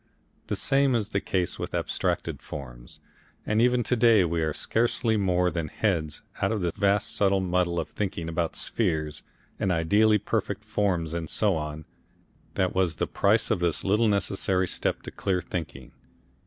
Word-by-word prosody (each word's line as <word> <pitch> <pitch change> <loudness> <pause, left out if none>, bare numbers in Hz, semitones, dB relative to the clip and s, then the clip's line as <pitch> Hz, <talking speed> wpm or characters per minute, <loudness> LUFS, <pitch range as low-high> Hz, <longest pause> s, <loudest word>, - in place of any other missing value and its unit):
The - - -1
same 135 -1 +3
is 105 -3 -1
the 100 -2 -1
case 90 -2 -1
with - - -4
abstracted - - -2
forms, - - -9 0.5
and 105 +1 +2
even 125 0 +3
to 125 - +1
day 115 -5 +5
we 85 0 -1
are 80 -1 0
scarcely 115 +5 0
more 90 -3 +2
than 80 -1 -2
heads 80 -4 -1 0.2
out 95 - +2
of 110 -3 -1
the 85 -1 0
vast 100 0 +1
subtle 100 -1 +3
muddle 90 -2 0
of - - -4
thinking 90 -5 -3
about 85 0 -2
spheres 80 -8 -1 0.4
and 95 - +1
ideally 105 +6 +4
perfect - - -2
forms 90 -6 0
and 85 -2 -3
so 105 -4 +2
on, 75 0 -5 0.7
that 95 -1 +1
was 95 -3 +1
the - - -1
price - - +2
of - - +2
this 85 -2 0
little 105 +4 +3
necessary 95 -2 0
step - - -2
to - - -7
clear 95 -2 -1
thinking. 90 -2 -6
95 Hz, 170 wpm, -26 LUFS, 85-105 Hz, 0.7 s, day